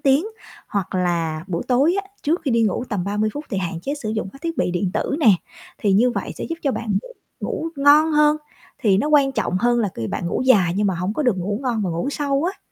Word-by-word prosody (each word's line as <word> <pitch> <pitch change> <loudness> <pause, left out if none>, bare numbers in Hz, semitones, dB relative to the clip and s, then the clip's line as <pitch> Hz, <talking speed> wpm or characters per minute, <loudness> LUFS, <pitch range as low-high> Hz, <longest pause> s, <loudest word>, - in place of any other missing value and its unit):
tiếng. 285 +5 +3 0.4
Hoặc 200 -3 -3
là 165 -3 -1
buổi 170 -3 -2
tối 275 +7 +3
á 390 - -19
trước 325 +5 +1
khi 275 - 0
đi 230 -1 +3
ngủ 220 +3 0
tầm 200 -5 -2
30 210 +2 0
phút 290 +1 -5
thì 195 - -1
hạn 175 -2 -3
chế 280 - -2
sử 240 -8 -5
dụng 220 -3 -2
các 275 - -14
thiết 330 -1 -3
bị - - +1
điện 180 +1 -1
tử 280 - -1
nè, 295 - +2 0.5
thì 205 - +1
như 235 +6 +4
vậy - - -4
sẽ - - -4
giúp 330 - -4
cho 275 - +1
bạn 220 -4 -3
ngủ - - -11 0.3
ngủ 325 - -3
ngon 295 +3 +5
hơn, 300 0 +4 0.4
thì 200 -4 +3
nó 290 - 0
quan 285 -3 +4
trọng 185 -8 -1
hơn 240 +3 +2
là 210 - +1
ki 115 - -4
bạn 175 - -3
ngủ - - -1
dài 205 -10 +4
nhưng 205 0 +2
mà 190 - +1
hổng 180 +4 -2
có 305 - 0
được 245 -8 +2
ngủ 200 +3 -2
ngon 240 -5 0
và 185 - -1
ngủ 170 +10 -2
sâu 285 0 0
á. - - -21
230 Hz, 265 wpm, -21 LUFS, 190-285 Hz, 0.5 s, ngon